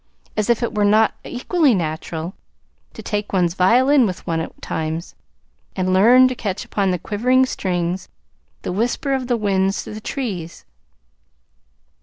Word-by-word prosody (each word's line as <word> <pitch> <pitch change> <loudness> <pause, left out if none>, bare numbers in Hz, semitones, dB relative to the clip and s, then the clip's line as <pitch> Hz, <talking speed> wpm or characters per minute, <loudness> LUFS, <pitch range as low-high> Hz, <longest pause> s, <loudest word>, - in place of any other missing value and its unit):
As 215 +1 -1
if 235 0 +2
it 235 - -2
were 210 -1 +1
not 215 +2 +4
equally 280 - +1
natural 160 0 -4 0.6
to - - -9
take 205 0 -3
one's 175 -3 +1
violin 245 +8 +4
with 185 -2 -6
one 165 -2 -1
at 160 - -6
times, 160 +2 -4 0.6
and 185 -1 0
learn 245 +7 +6
to 255 - -2
catch 200 -5 -4
upon 200 -2 0
the 180 - +1
quivering 250 +8 +2
strings 180 -5 -2 0.5
the - - -3
whisper 240 - -1
of 260 -2 -1
the 245 -1 +1
winds 195 -2 0
through - - -8
the 215 - -7
trees! 195 - -5
205 Hz, 155 wpm, -20 LUFS, 180-245 Hz, 0.6 s, learn